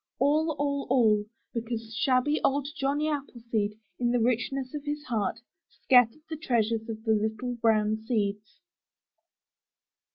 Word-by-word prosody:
All, 305 +4 +2
all, 280 -1 -1
all 220 -5 +4 0.3
because 230 -1 -4
shabby 260 +5 +2
old 280 0 +2
Johnny 285 +3 0
Appleseed, 235 -8 -2 0.2
in 240 -1 +1
the 245 0 +2
richness 255 +3 0
of 295 -1 -5
his 295 0 -3
heart, 225 -5 -1 0.3
scattered 250 +3 +3
the 315 -1 -5
treasures 230 -5 0
of 220 -1 -6
the 225 - +1
little 220 +3 -1
brown 220 -2 +2
seeds! 215 -2 -2
240 Hz, 130 wpm, -28 LUFS, 220-280 Hz, 0.3 s, all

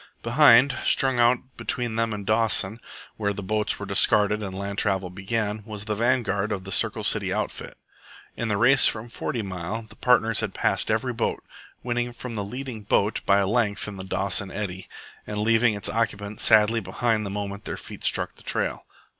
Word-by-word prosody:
Behind, 125 +1 +5
strung 130 -2 +2
out 120 +1 +5 0.2
between 115 -1 -1
them 115 0 0
and 105 -1 -5
Dawson 110 -1 +2 0.4
(where 100 -2 -1
the 100 - -6
boats 105 +2 -1
were - - -6
discarded 105 0 +3
and 95 -2 -5
land 100 +1 -4
travel 95 -3 -1
began), 105 +2 -2
was 105 -1 -7
the 110 - -1
vanguard 110 -3 0
of 95 -3 -3
the 95 - -8
Circle - - +2
City - - +2
outfit. - - -4 0.6
In 115 - -3
the 105 -2 0
race 125 +4 +6
from 115 +2 -3
Forty 115 0 -4
Mile 95 +3 -5
the 110 - -16
partners 115 -3 +2
had 110 -4 -3
passed - - 0
every - - 0
boat, - - -2 0.4
winning 120 0 -2
from 120 0 -7
the 105 -2 -2
leading 125 +1 -6
boat 105 +1 +1
by 100 - +5
a 100 - +2
length 105 -1 0
in 105 -2 -7
the 95 - -7
Dawson 95 +1 -1
eddy, 95 -1 -5 0.4
and 105 - -4
leaving 110 +1 +3
its 100 - -2
occupants 105 -2 -2
sadly 110 +1 +5
behind 115 -1 -1
the 100 - -4
moment 100 0 -5
their - - -4
feet - - -10
struck - - 0
the - - -17
trail. - - -3
110 Hz, 190 wpm, -25 LUFS, 100-115 Hz, 0.6 s, race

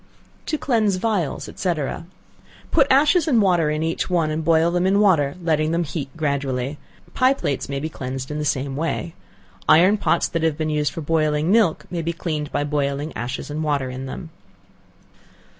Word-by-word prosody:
To 310 - 0
Cleanse 220 -8 +1
Vials, 185 -6 -1
&c. 180 -2 0 1.0
Put 280 -4 +4
ashes 300 +5 +4
and 250 -7 +4
water 175 -6 +3
in 155 +1 -1
each 165 +3 -2
one, 165 -4 +1
and 155 +1 -2
boil 165 +1 +3
them 175 +1 +1
in 200 +1 +3
water, 165 -9 +3
letting 155 -2 +1
them 170 +1 +1
heat 145 -3 -5
gradually. 140 -2 -2 0.3
Pie 260 +1 +3
plates 140 - -3
may 140 0 -2
be 155 - -3
cleansed 130 -2 -6
in 150 - -3
the - - -2
same 140 -2 -1
way. 165 +2 -2 0.6
Iron 185 +6 +6
pots 170 - +1
that 165 - -2
have 160 -2 +1
been 155 -1 -1
used 150 -1 0
for 165 - -6
boiling 155 +1 +1
milk, 205 -8 +3
may 175 -2 -2
be 170 +1 -2
cleaned 155 -3 -4
by - - 0
boiling 145 +1 -2
ashes 125 +4 -4
and 155 +2 -3
water 140 -4 -1
in 130 +1 -6
them. 160 +5 -7
160 Hz, 185 wpm, -22 LUFS, 145-180 Hz, 1.0 s, Iron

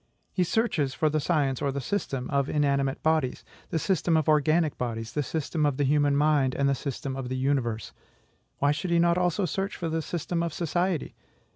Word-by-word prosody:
He 185 - +2
searches 170 - 0
for 155 -1 +1
the 155 - +1
science, 140 -4 0
or 140 - +1
the 140 - -3
system, 135 -4 -2
of 140 0 +1
inanimate 140 -2 +1
bodies, 155 -5 +1 0.2
the - - -1
system 170 -1 +1
of 155 - 0
organic 155 +1 +3
bodies, 115 -2 -4
the 150 - 0
system 155 +2 -2
of 145 -3 +1
the 145 - +1
human 145 0 +3
mind, 145 -3 +3
and 140 - +2
the 140 - +3
system 135 0 -4
of 130 -2 -5
the 130 - -2
universe: 130 -5 -1 0.6
why 140 +1 +3
should 155 +5 -2
he 170 - +3
not 170 +1 +3
also 180 +2 +1
search 195 +4 -2
for 170 - -3
the 160 0 -1
system 170 +1 -2
of 170 -2 -2
society? 175 0 -1
150 Hz, 205 wpm, -27 LUFS, 135-170 Hz, 0.6 s, organic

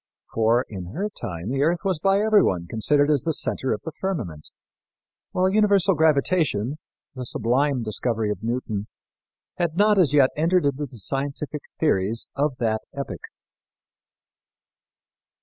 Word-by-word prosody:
For, 115 +3 +2
in 95 -2 -8
her 205 +4 -2
time, 85 - -6
the 135 +1 0
earth 170 +4 +1
was 190 -5 0
by 195 +3 +2
everyone 205 - +3
considered 145 - +2
as 145 -4 +2
the 160 -2 -1
center 130 - 0
of 105 - -2
the 160 - -5
firmament, 120 - -4 0.8
while 185 +1 +2
universal 200 -1 +4
gravitation 155 - +1 0.3
the 130 - -6
sublime 125 +3 +1
discovery 110 0 -1
of 105 - -5
Newton 110 -3 -3 0.7
had 170 -2 -1
not 210 0 +4
as 160 -8 +4
yet 140 -3 +4
entered 170 +2 +2
into 140 +1 -1
the 125 - -13
scientific 140 +5 -3 0.2
theories 115 -6 +1
of 140 -2 0
that 110 -2 0
epoch. 140 0 -6
140 Hz, 140 wpm, -24 LUFS, 115-170 Hz, 0.8 s, universal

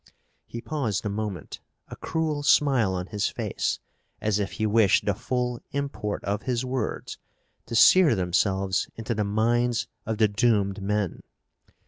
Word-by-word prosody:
He 115 - -7
paused 115 -6 -2
a - - 0
moment, 100 -5 -5 0.3
a - - -7
cruel 160 -2 -2
smile 135 -9 +3
on 90 0 -3
his 105 +1 -1
face, - - -2 0.4
as 105 -1 0
if 100 -2 -2
he 110 - -2
wished 105 -2 +3
the 105 - +2
full 125 +3 -2
import 140 -7 -3
of 100 +1 -2
his 125 -1 -1
words 125 -3 -3 0.5
to 115 - -4
sear 165 +2 +7
themselves 95 +1 0
into 115 +1 -3
the 105 -1 0
minds 120 +3 +1 0.2
of 110 -1 -1
the 110 -1 +4
doomed 100 -2 +1
men. 105 -2 -1
110 Hz, 150 wpm, -26 LUFS, 100-120 Hz, 0.5 s, sear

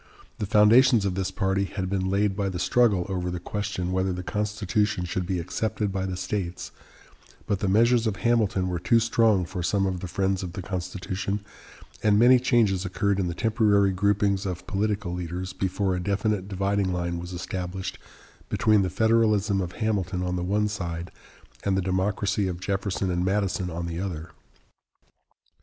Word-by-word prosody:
The 105 - -2
foundations 110 +2 +5
of 95 - 0
this 95 0 -1
party 95 +1 0
had 95 -1 -4
been 95 0 -1
laid 100 0 +1
by 100 -1 -1
the 90 - -4
struggle 100 -2 +2
over 90 -2 -2
the 90 0 -3
question 95 -1 -3
whether 95 0 0
the 90 0 -4
Constitution 105 -1 -1
should 90 +1 -3
be 95 - -1
accepted 105 +4 -2
by 95 0 -2
the 90 -1 -4
states; 95 -1 -4 0.7
but 100 - -1
the 100 - -1
measures 115 +4 +4
of 105 - -1
Hamilton 105 -5 +1
were 90 -1 -2
too 115 +6 +3
strong 110 -5 +3
for 90 +1 -5
some 95 +3 +1
of 95 -2 -1
the 95 - -5
friends 95 +1 0
of 90 -2 -6
the 95 - -6
Constitution, 95 +2 -3 0.6
and 105 -1 +4
many 125 +3 +7
changes 110 -7 +2
occurred 100 +1 0
in 90 - 0
the 85 - -3
temporary 105 -3 +3
groupings 100 0 +1
of 90 -2 -5
political 100 -2 -1
leaders 90 +1 -4
before 95 0 -1
a - - -2
definite 100 0 -1
dividing 100 0 0
line 85 -1 -2
was 90 +1 -7
established 90 +1 -5 0.5
between 110 -2 +3
the 95 - 0
Federalism 110 -1 +2
of 90 -1 -4
Hamilton 95 -5 -1
on 90 0 -1
the 90 - -2
one 105 +3 +1
side 85 -4 -4 0.5
and 95 -1 +1
the - - +2
Democracy 95 +2 0
of 90 -2 -4
Jefferson 95 0 -1
and 90 0 0
Madison 95 -1 0
on 85 0 -4
the 85 0 -4
other. 85 -4 -5
95 Hz, 180 wpm, -26 LUFS, 90-105 Hz, 0.7 s, many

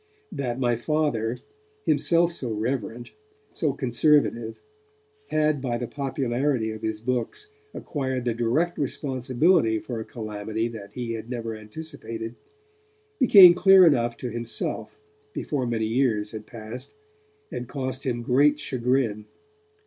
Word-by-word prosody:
That 130 -7 -3
my 120 -2 +2
Father, 120 -4 0 0.5
himself 170 0 +3
so 130 -8 -4
reverent, 115 +1 -3 0.4
so 155 - 0
conservative, 120 -3 +1 0.7
had 155 -2 +1
by 120 -3 -1
the 120 - -3
popularity 130 -3 -1
of 110 0 -8
his 110 -1 -2
books 125 - -2 0.2
acquired 130 -4 -3
the 120 - +1
direct 120 +10 0
responsibility 130 -1 +1
for 115 +1 -5
a - - -4
calamity 110 0 -4
that 105 -3 -10
he 120 -2 -3
had 115 0 -6
never 115 -2 -4
anticipated 115 -1 -7 0.9
became 195 -9 +9
clear 185 +1 +7
enough 120 -7 +2
to 125 - -5
himself 120 - -3 0.4
before 135 -4 -2
many 115 -2 0
years 110 -3 +1
had 110 -1 -8
passed, 115 - -8 0.6
and 125 - -5
cost 130 0 -4
him 120 -3 -2
great 145 +5 +4
chagrin. 125 -5 -1
125 Hz, 125 wpm, -25 LUFS, 115-145 Hz, 0.9 s, became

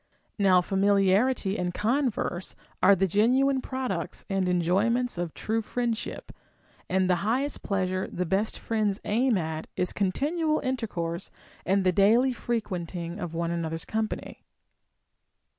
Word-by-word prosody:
Now 185 -2 +5
familiarity 195 +3 +2
and 180 0 -2
converse 225 -6 -1 0.3
are 200 - +7
the 195 +1 +2
genuine 255 +8 +3
products 255 -12 -3
and 190 -1 +1
enjoyments 195 +6 +1
of 175 -2 -3
true 225 +1 -1
friendship, 230 0 -3 0.6
and 185 0 +2
the 180 -1 +3
highest 250 +10 -1
pleasure 185 -1 -1
the 180 - -3
best 195 +6 0
friends 215 -3 -1
aim 235 +1 +2
at 160 -2 -3
is 180 - 0
continual 305 - 0
intercourse 200 -10 -3 0.4
and 195 +1 +3
the 185 - +4
daily 225 +8 +4
frequenting 180 -8 -3
one 170 +1 -2
another's 165 -1 -3
com 220 0 0
pany. - - -7
200 Hz, 125 wpm, -27 LUFS, 180-235 Hz, 0.6 s, are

